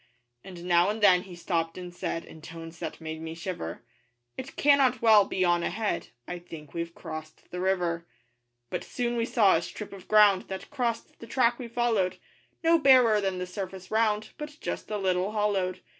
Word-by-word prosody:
And 180 Hz, -2 st, -10 dB
now 175 Hz, +1 st, +4 dB
and 215 Hz, +2 st, -2 dB
then 185 Hz, -4 st, +6 dB
he 185 Hz, -2 st, -10 dB
stopped 165 Hz, -1 st, -2 dB
and 180 Hz, -1 st, -7 dB
said 170 Hz, -2 st, -3 dB
In 160 Hz, -, -13 dB
tones 165 Hz, +1 st, -10 dB
that -, -, -5 dB
made 160 Hz, -1 st, -6 dB
me 160 Hz, 0 st, -6 dB
shiver 160 Hz, -, -5 dB, 0.5 s
'It 260 Hz, +1 st, -7 dB
cannot 275 Hz, -3 st, +4 dB
well 215 Hz, -3 st, +7 dB
be 185 Hz, -1 st, 0 dB
on 175 Hz, 0 st, +3 dB
ahead, 210 Hz, +5 st, -2 dB, 0.2 s
'I 175 Hz, -, -5 dB
think 160 Hz, -4 st, -11 dB
we've 170 Hz, 0 st, -4 dB
crossed 155 Hz, 0 st, -9 dB
the 180 Hz, -, -4 dB
river.' 175 Hz, -3 st, 0 dB, 0.6 s
But -, -, -2 dB
soon 240 Hz, -1 st, -2 dB
we 230 Hz, -1 st, +1 dB
saw 215 Hz, -5 st, +4 dB
a -, -, -2 dB
strip 205 Hz, +4 st, -7 dB
of 195 Hz, -2 st, -11 dB
ground 210 Hz, -3 st, +5 dB
That 190 Hz, -1 st, -7 dB
crossed 240 Hz, -5 st, -3 dB
the 230 Hz, -, -10 dB
track 240 Hz, 0 st, +2 dB
we 245 Hz, -, -5 dB
followed 230 Hz, -6 st, 0 dB, 0.5 s
No 330 Hz, 0 st, +5 dB
barer 250 Hz, -7 st, +6 dB
than 190 Hz, -2 st, -1 dB
the 180 Hz, -, -3 dB
surface 185 Hz, 0 st, -7 dB
round, 215 Hz, -1 st, +1 dB
But 300 Hz, 0 st, -7 dB
just -, -, -5 dB
a 210 Hz, -, -1 dB
little 190 Hz, +1 st, 0 dB
hollowed. 200 Hz, -4 st, 0 dB
190 Hz, 190 wpm, -28 LUFS, 175-225 Hz, 0.6 s, well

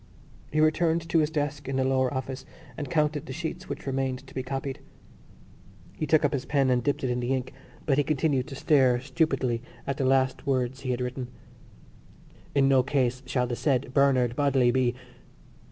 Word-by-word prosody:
He 155 Hz, -, 0 dB
returned 160 Hz, +1 st, +2 dB
to 165 Hz, -, +3 dB
his 150 Hz, -1 st, +2 dB
desk 145 Hz, -3 st, -3 dB
in 135 Hz, -, -2 dB
the 130 Hz, -, +2 dB
lower 130 Hz, -1 st, +2 dB
office 130 Hz, 0 st, -4 dB, 0.3 s
and 145 Hz, +1 st, -5 dB
counted 150 Hz, -3 st, 0 dB
the 130 Hz, -, -5 dB
sheets 175 Hz, +3 st, -5 dB
which -, -, -6 dB
remained 135 Hz, -1 st, -2 dB
to -, -, -15 dB
be 130 Hz, -, -2 dB
copied. 135 Hz, +1 st, -4 dB, 1.2 s
He 155 Hz, -, -3 dB
took 155 Hz, 0 st, +4 dB
up 145 Hz, -, +1 dB
his 135 Hz, -2 st, -1 dB
pen 135 Hz, -3 st, +2 dB
and 125 Hz, -1 st, +2 dB
dipped 145 Hz, +1 st, -1 dB
it 130 Hz, -, 0 dB
in 125 Hz, -, -1 dB
the 125 Hz, +1 st, -2 dB
ink 130 Hz, -1 st, -4 dB, 0.3 s
but 140 Hz, -2 st, +2 dB
he -, -, +4 dB
continued 140 Hz, -2 st, 0 dB
to 140 Hz, -, -7 dB
stare 130 Hz, -4 st, +3 dB
stupidly 130 Hz, -3 st, 0 dB, 0.2 s
at 140 Hz, 0 st, -2 dB
the 135 Hz, -, -1 dB
last 130 Hz, +2 st, +1 dB
words 130 Hz, -1 st, 0 dB
he 135 Hz, -1 st, -5 dB
had 125 Hz, 0 st, -1 dB
written: 125 Hz, 0 st, -3 dB, 1.3 s
_In 140 Hz, -, +4 dB
no 135 Hz, -1 st, +5 dB
case 130 Hz, -2 st, 0 dB
shall 125 Hz, -1 st, +1 dB
the 120 Hz, -1 st, -3 dB
said 130 Hz, -1 st, 0 dB
Bernard 130 Hz, -4 st, +3 dB
Bodley 135 Hz, -3 st, +3 dB
be.... 125 Hz, -1 st, +1 dB
135 Hz, 195 wpm, -27 LUFS, 130-145 Hz, 1.3 s, no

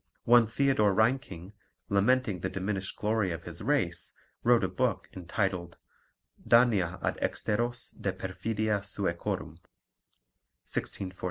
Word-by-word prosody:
One 120 Hz, -1 st, +6 dB
Theodore 110 Hz, -5 st, +2 dB
Reinking, 110 Hz, -, 0 dB, 0.3 s
lamenting 105 Hz, 0 st, +2 dB
the 95 Hz, -, -2 dB
diminished 95 Hz, 0 st, -3 dB
glory 105 Hz, -3 st, 0 dB
of 80 Hz, 0 st, -5 dB
his -, -, -8 dB
race, -, -, -1 dB, 0.3 s
wrote 120 Hz, -3 st, +4 dB
a -, -, +2 dB
book 95 Hz, 0 st, -1 dB
entitled 90 Hz, -1 st, -2 dB, 0.7 s
Dania 105 Hz, -7 st, +4 dB
ad -, -, -1 dB
exteros 120 Hz, +3 st, -1 dB
de 95 Hz, -, 0 dB
perfidia 105 Hz, +3 st, -2 dB
Suecorum 100 Hz, -4 st, -3 dB, 1.1 s
(1644). 95 Hz, -1 st, -4 dB
100 Hz, 110 wpm, -29 LUFS, 95-115 Hz, 1.1 s, One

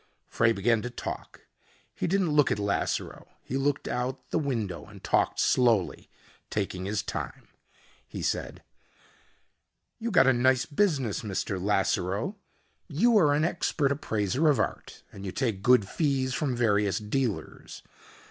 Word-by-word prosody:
Frey 115 Hz, 0 st, +2 dB
began 115 Hz, +1 st, +2 dB
to 125 Hz, -, -4 dB
talk. 125 Hz, -, -7 dB, 0.5 s
He -, -, -2 dB
didn't 190 Hz, -2 st, +1 dB
look 150 Hz, -2 st, +4 dB
at -, -, +1 dB
Lasseroe. 100 Hz, -1 st, -2 dB, 0.2 s
He 130 Hz, -, -5 dB
looked 140 Hz, +1 st, 0 dB
out 125 Hz, +1 st, -3 dB
the -, -, +1 dB
window 115 Hz, -, -2 dB
and -, -, -14 dB
talked -, -, +1 dB
slowly, 115 Hz, -7 st, +2 dB, 0.4 s
taking 95 Hz, -3 st, -3 dB
his 105 Hz, +1 st, -1 dB
time. -, -, -6 dB, 0.6 s
He -, -, -6 dB
said, -, -, -2 dB, 1.4 s
"You 235 Hz, -, -2 dB
got 180 Hz, -11 st, +5 dB
a 130 Hz, -, +5 dB
nice 130 Hz, +1 st, +3 dB
business, 145 Hz, -, 0 dB
Mr. 100 Hz, -3 st, -3 dB
Lasseroe. 100 Hz, -, 0 dB, 0.5 s
You 220 Hz, +10 st, +3 dB
are 145 Hz, -5 st, +4 dB
an 155 Hz, +2 st, +2 dB
expert 160 Hz, -4 st, 0 dB
appraiser 125 Hz, -, +1 dB
of 145 Hz, -, +3 dB
art, -, -, -3 dB
and 100 Hz, -, -10 dB
you 95 Hz, -, -4 dB
take 110 Hz, -3 st, -1 dB
good 120 Hz, -3 st, +4 dB
fees 135 Hz, -, 0 dB
from 140 Hz, -3 st, -1 dB
various 105 Hz, -5 st, +2 dB
dealers. 110 Hz, +1 st, -3 dB
125 Hz, 145 wpm, -28 LUFS, 105-145 Hz, 1.4 s, got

